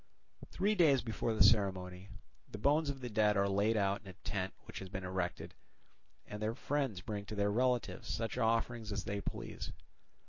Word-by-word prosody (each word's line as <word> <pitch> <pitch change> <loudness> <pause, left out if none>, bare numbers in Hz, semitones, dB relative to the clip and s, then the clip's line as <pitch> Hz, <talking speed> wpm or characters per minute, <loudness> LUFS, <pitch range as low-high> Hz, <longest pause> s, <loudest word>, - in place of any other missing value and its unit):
Three 200 +3 +1
days 155 -9 +4
before 110 0 -1
the - - +6
ceremony, 95 -3 +2 0.4
the - - -6
bones 145 +7 +3
of 135 -1 -4
the 125 - -4
dead 105 -1 +3
are 100 0 +3
laid 100 +3 +2
out 100 -1 +1
in 105 - -16
a 95 - -8
tent 95 0 -3
which - - -8
has 95 - -7
been 95 0 -5
erected; 90 -1 -3 0.7
and 105 0 -7
their 110 +2 -1
friends 135 -11 -1
bring 100 +1 -4
to 105 - -6
their 100 0 +2
relatives 125 +2 0
such 115 -1 -2
offerings 115 0 +1
as 100 -1 -2
they 100 -2 -3
please. - - -5
105 Hz, 185 wpm, -35 LUFS, 100-120 Hz, 0.7 s, the